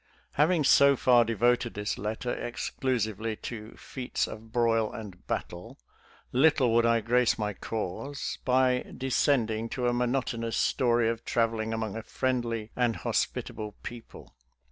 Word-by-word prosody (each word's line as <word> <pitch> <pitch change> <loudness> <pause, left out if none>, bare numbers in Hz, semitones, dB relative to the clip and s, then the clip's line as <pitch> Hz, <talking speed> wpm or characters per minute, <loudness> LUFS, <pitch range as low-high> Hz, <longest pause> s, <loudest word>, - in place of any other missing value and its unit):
Having 160 +1 +3
so 140 0 +6
far 125 -2 +5
devoted 120 +2 +1
this 105 0 -2
letter 110 +4 -3
exclusively 115 -3 -2
to 110 0 -8
" - - -21
feats 125 -2 -3
of 110 +1 -10
broil 115 -2 +2
and 105 -6 -9
battle," 90 +1 -5 0.5
"little 130 -3 +4
would 115 0 +4
I 115 -1 +3
grace 120 +1 +2
my 105 -2 -2
cause 115 +8 -4
" - - -38
by 130 0 +3
descending 115 -4 +1
to 125 0 -1
a 120 - +2
monotonous 120 -2 -1
story 120 -2 +2
of 115 0 -2
traveling 115 -1 0
among 110 -2 -3
a 115 - -4
friendly 115 -3 -2
and 120 -2 +1
hospitable 105 -2 -2
peo 120 -1 -6
ple. - - -14
115 Hz, 145 wpm, -28 LUFS, 110-125 Hz, 0.5 s, so